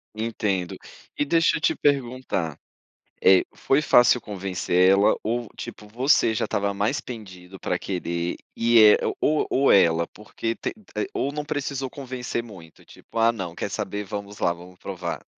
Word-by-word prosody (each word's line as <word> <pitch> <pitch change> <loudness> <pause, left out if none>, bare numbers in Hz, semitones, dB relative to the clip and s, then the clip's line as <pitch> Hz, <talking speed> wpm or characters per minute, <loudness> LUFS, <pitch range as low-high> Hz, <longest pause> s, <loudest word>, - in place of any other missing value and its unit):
Entendo. 105 -5 -2 0.4
E 145 - +1
deixa 165 +1 +3
eu - - -8
te - - +2
perguntar. 130 - -1 0.7
Eh, 95 -1 +6
foi 135 +2 +2
fácil 120 -4 +5
convencer 95 -2 +1
ela 100 +1 +5
ou, 115 0 -2
tipo, 105 - -8
você 120 0 +2
já - - 0
estava 100 0 -1
mais 105 +8 0
pendido 95 -6 -10
pra - - -1
querer, 85 -2 -3 0.2
e 115 0 +5
é 105 - +6
o - - -1
ou 155 0 +2
ou 135 +1 +3
ela, 85 -3 +4
porque 115 +2 -5
te - - -4
te 215 - -6
ou 140 - -1
não 150 0 -4
precisou 140 -3 -3
convencer 125 -3 -5
muito, 90 -8 -14
tipo: - - -17
"Ah, 115 +1 +5
não, 95 -7 -5
quer - - -4
saber, 105 0 -3
vamos 100 0 -7
lá, 85 - +2
vamos 90 +1 -13
provar". 90 -3 -5
105 Hz, 170 wpm, -24 LUFS, 95-130 Hz, 0.7 s, Eh